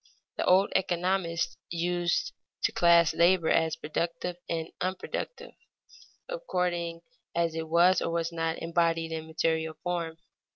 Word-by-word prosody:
The - - -1
old 190 +2 +5
economists 175 -2 0
used 175 +1 0 0.3
to - - +3
class 170 -2 +5
labor 170 0 +4
as 160 -1 +2
productive 170 +3 -3
and 165 -1 -2
unproductive 190 - -4 0.7
according 180 - -2 0.3
as 170 -1 +1
it 160 0 -4
was 175 +3 +5
or - - -1
was 170 0 -1
not 165 -1 -1
embodied 165 -1 +1
in 160 0 -4
material 160 0 0
form. 170 -2 -2
170 Hz, 125 wpm, -29 LUFS, 165-180 Hz, 0.7 s, old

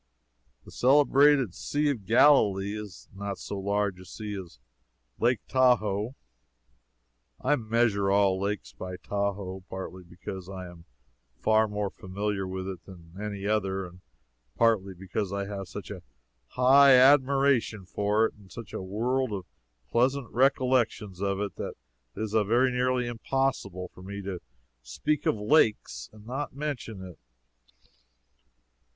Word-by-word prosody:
The - - -13
celebrated 140 -3 +4
Sea 145 +6 0
of 110 -9 -6
Galilee 105 -6 +4
is 105 -3 -8
not 100 0 -5
so 100 - -6
large 100 -1 -1
a 95 - -12
sea 105 +3 -7
as 95 -4 -9 0.6
Lake 120 -3 +2
Tahoe 120 -3 +2 1.2
[I 135 +3 +2
measure 110 -4 +1
all 100 -1 +3
lakes 100 0 -3
by 90 0 -7
Tahoe, 100 -2 -3
partly 95 -1 -7
because 90 +1 -8
I 95 -1 -7
am 85 -1 -13 0.5
far 110 - +3
more 105 -1 -3
familiar 100 0 -3
with 95 0 -5
it 95 -3 -6
than 85 -4 -14
with 95 - -9
any 100 -2 -5
other, 95 -2 0
and 90 +1 -13 0.5
partly 105 -5 +2
because 95 +2 -4
I 100 0 -2
have 100 -1 -6
such 100 +1 -8
a 95 -3 -7 0.5
high 135 +2 +6
admiration 135 -5 +4
for 105 +4 +1
it - - -3
and 100 -3 -19
such 115 -3 -9
a - - -4
world 120 +7 -1
of 95 -3 -4 0.5
pleasant 130 +1 +1
recollections 125 -7 +1
of 100 -1 0
it, 100 -1 -4
that - - -5 0.4
it - - -5
is 110 - -4
very 115 +4 +3
nearly 125 0 +1
impossible 120 -6 -2
for - - -14
me 100 +1 -7
to 95 -2 -4 0.4
speak 145 - -2
of - - +3
lakes 105 - +2
and 105 -1 -16
not 135 +4 -4
mention 125 -9 -5
it. 90 -2 -12
105 Hz, 145 wpm, -28 LUFS, 95-125 Hz, 1.2 s, high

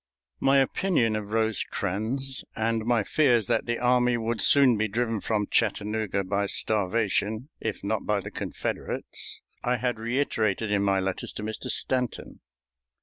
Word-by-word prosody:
My 135 +1 +4
opinion 135 - +2
of 105 -1 -4
Rosecrans 110 - 0
and 110 0 0
my 120 -2 +2
fears 120 -4 +3
that - - 0
the 120 0 0
army 125 0 +3
would 115 -1 -1
soon 135 -4 +6
be 110 +1 0
driven 115 0 -1
from 105 -2 0
Chattanooga 105 -2 0
by 100 +2 -1
starvation, 110 +4 0
if - - -4
not - - -2
by - - +2
the - - -7
Confederates, - - -4 0.2
I 125 0 +1
had 120 -1 -1
reiterated 115 -4 0
in 100 -1 +2
my 100 -1 +2
letters 95 0 -2
to - - -6
Mr. 110 0 -5
Stanton. 125 -2 -2
110 Hz, 145 wpm, -27 LUFS, 105-125 Hz, 0.2 s, soon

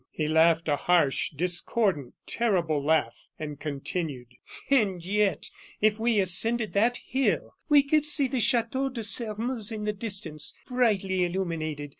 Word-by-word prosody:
He 155 - -3
laughed 160 +1 +3
a 145 -2 +1
harsh, 170 -6 +2
discordant, 175 - -1
terrible 175 -10 0
laugh, 150 -6 +1 0.2
and 150 -2 -7
continued: 145 -3 -4 0.4
"And 195 -10 +2
yet, 205 +1 0 0.3
if 215 0 +2
we 230 -1 +2
ascended 215 +4 +3
that 230 +5 +2
hill, 265 +1 -1 0.2
we 290 -2 +6
could 300 +1 +1
see 295 -2 +2
the 255 0 -2
Chateau 250 +3 +1
de 240 -3 -6
Sairmeuse 225 +1 -2
in 215 -1 -5
the 210 0 -1
distance, 190 -8 -4
brightly 200 -7 +1
illuminated. 165 -5 -3
195 Hz, 140 wpm, -27 LUFS, 160-230 Hz, 0.4 s, we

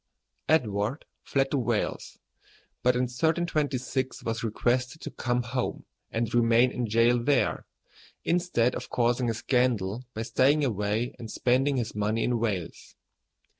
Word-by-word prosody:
Edward 115 -3 +1 0.2
fled 135 -1 0
to 140 - +1
Wales, 120 - -2 0.6
but 125 0 +3
in 125 - +1
1326 135 -1 -1
was 115 0 -3
requested 125 +5 0
to - - -6
come 125 -1 -1
home 125 +1 -3 0.2
and 115 0 -2
remain 120 +1 +4
in 125 -2 -2
jail 115 +2 +3
there, 140 0 +1 0.6
instead 170 -9 +1
of - - -6
causing 120 0 +1
a 115 - -1
scandal 120 -3 0
by 110 - -2
staying 140 +5 +3
away 105 +1 -1
and 115 - -7
spending 130 +5 +1
his 120 -3 -2
money 105 +2 0
in 120 -1 +1
Wales. 100 -7 -3
120 Hz, 135 wpm, -27 LUFS, 115-130 Hz, 0.6 s, remain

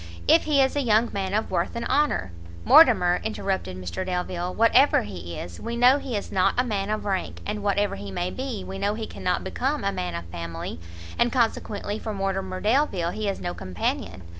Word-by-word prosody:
if - - +5
he 285 -3 +4
is 265 - 0
a 290 - +1
young 230 -1 +3
man 195 -1 -2
of 215 +2 -1
worth 175 +2 -1
and 235 - -3
honour 285 - +1 0.2
" 85 0 -15
"Mortimer," 215 - +6
interrupted 190 - -2
Mr 90 - -4
Delvile, 180 -1 -2
"whatever 230 +7 +4
he 85 -4 -7
is, 85 -1 -7
we 235 - -4
know 250 +4 +6
he 250 -6 -3
is 200 - -6
not 185 -1 +2
a 250 - +4
man 205 -4 -2
of 215 0 -2
rank, 195 -2 -2
and 210 0 -3
whatever 205 0 +1
he 100 0 -7
may 175 - -2
be, 255 -7 -4
we 195 0 -7
know 200 +1 0
he 220 0 -4
cannot 180 - -2
become 265 +9 -2
a 200 - +1
man 90 - -3
of 85 0 -5
family, 85 -1 -6 0.4
and 240 - +3
consequently 220 -4 -1
for 215 -2 -5
Mortimer 195 -1 -2
Delvile 210 - +1
he 210 +2 -2
is 195 - -3
no 175 - -3
companion. 90 0 -3
195 Hz, 210 wpm, -25 LUFS, 175-230 Hz, 0.4 s, Mortimer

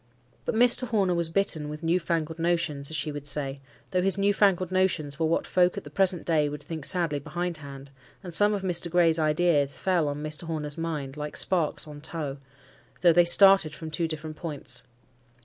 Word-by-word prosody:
But - - -2
Mr. 245 +2 +6
Horner 200 -6 +1
was 170 -1 -1
bitten 165 -4 -1
with 150 +2 -8
new 170 +2 +1
fangled 165 -1 -3
notions, 165 -4 -1
as 160 - -3
she 150 +2 -2
would 145 0 -7
say, 140 -1 -2 0.3
though 185 - +1
his 195 +1 +1
new 200 +1 +2
fangled 185 -3 +2
notions 175 -6 0
were 160 - +1
what 165 - 0
folk 180 +1 +1
at 200 - -5
the - - -12
present 185 -4 +1
day 155 -3 +1
would 145 0 -8
think 160 -4 -6
sadly 165 -5 0
behindhand; 145 -4 -6 0.3
and 175 -2 -8
some 205 +3 +3
of 195 - -5
Mr. 175 -2 0
Gray's 170 -1 +3
ideas 155 -2 +1
fell 180 -5 0
on 145 +1 -4
Mr. 155 +2 -4
Horner's 150 -3 -4
mind 155 -4 -5
like 150 0 -5
sparks 170 -5 +1
on 145 -1 -10
tow, 150 -3 -3 0.6
though 175 -2 +5
they 175 +1 +5
started 190 -3 +6
from 160 0 -8
two 165 +2 -1
different 155 -1 -5
points. 145 -7 -6
165 Hz, 200 wpm, -26 LUFS, 150-180 Hz, 0.6 s, Mr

